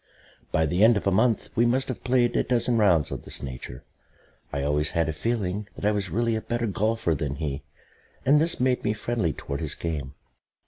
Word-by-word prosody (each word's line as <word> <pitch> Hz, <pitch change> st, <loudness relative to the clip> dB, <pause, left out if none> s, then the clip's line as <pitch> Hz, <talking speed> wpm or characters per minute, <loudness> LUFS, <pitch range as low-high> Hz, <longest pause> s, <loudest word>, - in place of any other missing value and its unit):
By 80 Hz, -, +2 dB
the 90 Hz, +6 st, +2 dB
end 115 Hz, 0 st, +6 dB
of -, -, -4 dB
a 100 Hz, -, +3 dB
month 110 Hz, +4 st, +2 dB
we 115 Hz, -, +4 dB
must 125 Hz, +3 st, +2 dB
have 130 Hz, -, -5 dB
played 125 Hz, -1 st, +2 dB
a -, -, +3 dB
dozen 120 Hz, -1 st, +1 dB
rounds 85 Hz, -8 st, +3 dB
of -, -, -4 dB
this -, -, -3 dB
nature. 60 Hz, -2 st, -7 dB, 0.7 s
I 70 Hz, -1 st, -2 dB
always 75 Hz, +1 st, +1 dB
had 85 Hz, -1 st, 0 dB
a 80 Hz, -, -1 dB
feeling 105 Hz, +1 st, -2 dB
that -, -, -5 dB
I 105 Hz, -, +4 dB
was 100 Hz, -3 st, -2 dB
really 115 Hz, +5 st, 0 dB
a 110 Hz, -, -2 dB
better 120 Hz, +1 st, -2 dB
golfer 110 Hz, -3 st, 0 dB
than 70 Hz, -1 st, -3 dB
he, 75 Hz, -2 st, -3 dB, 0.6 s
and 150 Hz, +3 st, +5 dB
this 165 Hz, +1 st, +1 dB
made 125 Hz, 0 st, +1 dB
me 105 Hz, -, +1 dB
friendly 110 Hz, -5 st, -1 dB
towards 70 Hz, 0 st, -5 dB
his -, -, 0 dB
game. 75 Hz, -5 st, -4 dB
105 Hz, 215 wpm, -26 LUFS, 80-120 Hz, 0.7 s, end